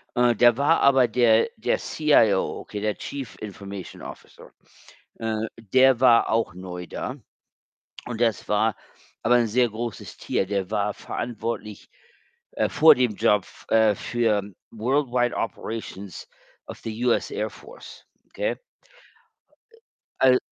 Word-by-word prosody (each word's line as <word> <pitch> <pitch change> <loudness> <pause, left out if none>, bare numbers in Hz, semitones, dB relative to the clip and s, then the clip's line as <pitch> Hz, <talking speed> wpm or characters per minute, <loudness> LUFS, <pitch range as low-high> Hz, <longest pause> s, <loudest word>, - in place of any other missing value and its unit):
Äh, 120 -1 +3
da 120 +1 +5
war 145 +4 +3
aber 130 -3 +5
der 115 - +3
der - - 0
CIO, 115 -11 +2
okay, 105 - -7
der 105 -1 -1
Chief 135 -5 -7
Information 100 -2 -8
Officer. - - -12 0.7
Äh, 110 -1 -2 0.2
der 130 +3 +3
war 120 -3 +5
auch 110 -5 0
neu 90 -1 -7
da. 125 - -5 0.9
Und 120 -1 -5
das 115 -4 0
war 105 +1 +1 0.5
aber 120 +2 +4
'n 120 - +2
sehr 120 +2 +2
großes 115 0 -6
Tier. 95 - -1
Der 100 -1 -2
war 105 -1 -1
verantwortlich, 115 -3 -5 0.6
äh, - - 0
vor 160 +1 +7
dem 125 -4 0
Job, 105 -2 +3
f - - -18
äh, 110 -2 +4
für 110 -2 0 0.3
world 130 +5 0
wide 120 0 0
operations 110 -5 -6 0.4
of - - -9
the 115 +2 -5
US 120 - +1
Air 430 - -3
Force, - - -14 0.2
okay? - - -2 1.2
Äh, 460 - -22 0.4
al 130 -1 +6
115 Hz, 135 wpm, -24 LUFS, 105-125 Hz, 1.2 s, vor